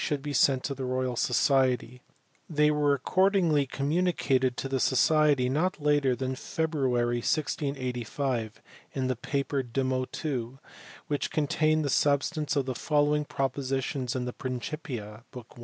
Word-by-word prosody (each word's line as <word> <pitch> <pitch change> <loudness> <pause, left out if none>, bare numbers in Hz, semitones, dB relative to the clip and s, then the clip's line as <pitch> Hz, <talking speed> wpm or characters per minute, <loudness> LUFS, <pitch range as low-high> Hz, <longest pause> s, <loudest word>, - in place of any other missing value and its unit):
4 145 - 0
be 145 +1 -6
sent 135 -2 +3
to 140 - -2
the 135 -1 -6
Royal 130 -1 -1
Society: 125 -1 +1 0.5
they 150 -1 +3
were 145 -1 +2
accordingly 175 -4 +2
communicated 140 -4 0
to - - -3
the 135 0 -1
Society 145 0 +3
not 160 +7 0
later 145 -3 +2
than 130 +1 -3
February, 130 -5 -1
1685, 130 -4 -2 0.3
in 130 -2 -1
the 130 0 0
paper 140 +3 -2
De 125 +1 -3
Motu^ 130 -1 -2 0.5
which 145 -1 -2
contains 155 +1 +1
the 145 - -1
substance 145 +2 +1
of 140 -2 +1
the 130 - -2
following 150 +2 +1
propo 135 -2 -2
sitions 135 -1 -2
in 125 -1 -2
the 125 - -4
Principia, 125 - -5
book 125 -4 -10
i. - - -15
135 Hz, 145 wpm, -28 LUFS, 125-150 Hz, 0.5 s, sent